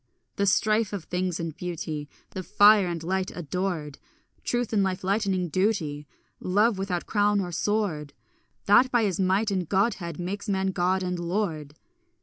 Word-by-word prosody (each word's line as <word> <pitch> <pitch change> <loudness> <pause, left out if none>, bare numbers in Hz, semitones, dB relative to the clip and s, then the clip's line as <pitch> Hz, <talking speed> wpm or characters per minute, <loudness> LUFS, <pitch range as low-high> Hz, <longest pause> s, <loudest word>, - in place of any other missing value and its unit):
The 200 - +1
strife 215 +1 +2
of 195 -5 -4
things 180 0 -2
and 165 -2 -4
beauty, 155 -4 -5 0.2
The 190 - -5
fire 205 +1 +5
and 170 -2 -4
light 190 +2 -1
adored, 175 -3 -3 0.4
Truth, 240 -2 -1
and 205 - +3
life 190 -1 -1
lightening 195 -2 0
duty, 155 -6 -1 0.3
Love 205 +3 +2
without 185 -3 -2
crown 205 -1 +2
or 180 -2 -3
sword, 175 -6 -1 0.5
That 220 +6 +6
by 240 -2 +2
his 195 -4 -1
might 195 +3 +2
and 185 -4 -2
godhead 190 -5 0
makes 200 +4 -4
man 190 -1 +1
god 185 +1 +1
and 180 -1 -2
lord. 170 -5 -2
185 Hz, 155 wpm, -26 LUFS, 175-205 Hz, 0.5 s, That